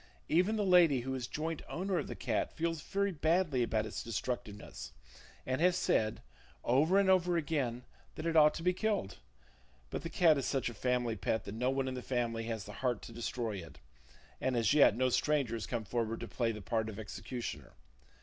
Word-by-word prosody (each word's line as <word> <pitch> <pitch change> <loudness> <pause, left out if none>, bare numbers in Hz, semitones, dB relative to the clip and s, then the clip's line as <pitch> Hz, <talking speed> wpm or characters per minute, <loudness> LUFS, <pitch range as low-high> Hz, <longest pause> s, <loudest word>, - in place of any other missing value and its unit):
Even 185 +7 +3
the 210 -2 0
lady 170 -8 +5
who 130 +2 -3
is 125 -2 -3
joint 160 +4 -3
owner 185 0 -1
of - - -4
the - - -5
cat - - -1
feels 165 -1 -2
very 200 +6 -1
badly 160 -4 +1
about 110 -2 +1
its 110 - -5
destructiveness, 105 - -5 0.5
and 130 +3 -1
has 180 0 +4
said, 110 -11 +1 0.4
over 150 +10 +3
and 200 -1 +4
over 180 -2 +4
again, 135 -6 -1 0.3
that 155 - -6
it 165 -1 0
ought 150 -1 +6
to 165 - -5
be 180 +1 +3
killed; 205 - -1 0.7
but - - -3
the 165 - -5
cat 160 -3 +4
is 135 - -2
such 130 -3 0
a - - -8
family 125 -2 0
pet 110 +3 -1
that 100 - -7
no 125 +3 0
one 135 0 0
in 130 - -2
the 125 - -5
family 120 -3 -1
has 115 -3 -3
the 105 - -9
heart 125 -4 0
to - - -9
destroy 115 -2 -3
it, 85 -4 -10 0.6
and 130 -2 0
as 115 0 +3
yet 145 -8 +6
no 130 0 +2
stranger 140 -2 +1
has 115 -2 -3
come 120 -3 -2
forward 115 +1 -2
to - - -6
play 115 -2 0
the 105 -2 -7
part 110 0 -1
of 105 - -8
executioner. 115 +3 -6
130 Hz, 205 wpm, -33 LUFS, 115-165 Hz, 0.7 s, ought